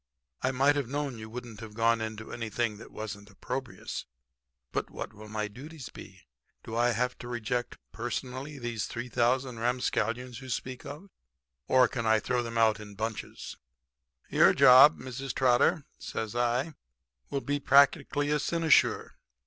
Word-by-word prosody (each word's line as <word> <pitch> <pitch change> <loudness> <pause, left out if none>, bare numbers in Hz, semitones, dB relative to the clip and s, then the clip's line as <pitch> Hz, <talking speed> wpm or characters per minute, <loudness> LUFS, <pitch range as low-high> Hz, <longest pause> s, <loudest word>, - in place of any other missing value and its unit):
'I 130 - +1
might 140 +3 +4
have 140 -4 -2
known 140 -4 -3
you 110 0 -8
wouldn't 120 -2 -8
have 110 -2 -9
gone 115 0 +3
into 110 0 -5
anything 115 -1 -2
that 110 - -11
wasn't 105 -1 -7
opprobrious. 130 +5 -5 0.6
But - - -2
what - - -7
will 105 +1 -12
my 105 0 -2
duties 135 +5 -10
be? - - -12 0.4
Do 110 - -6
I 120 +1 +3
have 125 +2 0
to 120 - -8
reject 120 0 -3
personally 130 +4 -5
these 120 -4 -3
3,000 125 +1 0
ramscallions 125 0 -1
you 130 - -9
speak 130 +1 -4
of, 175 +7 -9 0.6
or 130 -1 +5
can 115 -3 -3
I 110 0 +5
throw 125 +3 0
them 115 -1 -4
out 110 -2 +4
in 105 -1 -10
bunches?' 110 +1 -5 0.7
"'Your - - +5
job, 130 +5 +8
Mrs. 130 +1 -5
Trotter,' 135 +5 +3
says 110 0 -4
I, 120 +6 0 0.6
'will 140 - -2
be 145 +1 -1
practically 140 +1 +4
a 150 - +2
cynosure. 165 0 +2
120 Hz, 155 wpm, -29 LUFS, 110-135 Hz, 0.7 s, job